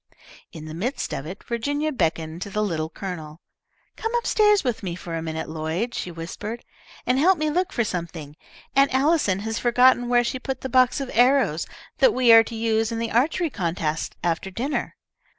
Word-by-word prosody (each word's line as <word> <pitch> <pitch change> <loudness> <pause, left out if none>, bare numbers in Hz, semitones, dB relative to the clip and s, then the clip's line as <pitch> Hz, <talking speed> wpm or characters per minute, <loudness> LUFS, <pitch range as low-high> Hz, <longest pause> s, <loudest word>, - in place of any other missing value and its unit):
In 160 -2 -9
the 155 - -7
midst 245 - -3
of 135 - -4
it 185 +4 -8
Virginia 285 +6 -2
beckoned 165 - -2
to 200 - -4
the 210 +2 -1
Little 160 -6 -2
Colonel. 160 -3 -7 0.6
"Come 450 - -3
up 475 - 0
stairs 420 -2 +4
with 245 -4 -1
me 180 -4 -4
for 170 -1 -8
a 165 - -3
minute, 160 0 -4
Lloyd," 160 +9 -3
she - - -4
whispered, 175 +7 -7 0.4
"and 255 +1 +2
help 365 +5 +4
me 305 0 0
look 360 +4 0
for 235 - 0
something. 170 -6 -5 0.4
Aunt 275 +1 +4
Allison 265 - +2
has 225 +1 -3
forgotten 245 0 +4
where 245 0 +4
she 255 +2 -3
put 260 0 -4
the 265 - -4
box 255 +2 +3
of 270 - -5
arrows 245 - +3 0.3
that - - +5
we 250 -2 +5
are 225 0 +9
to 230 - -7
use 225 0 0
in 230 - -3
the 230 0 -3
archery 300 +7 +1
contest 165 -5 -2
after 175 +2 -1
dinner. 250 +10 -3
225 Hz, 195 wpm, -24 LUFS, 170-260 Hz, 0.6 s, are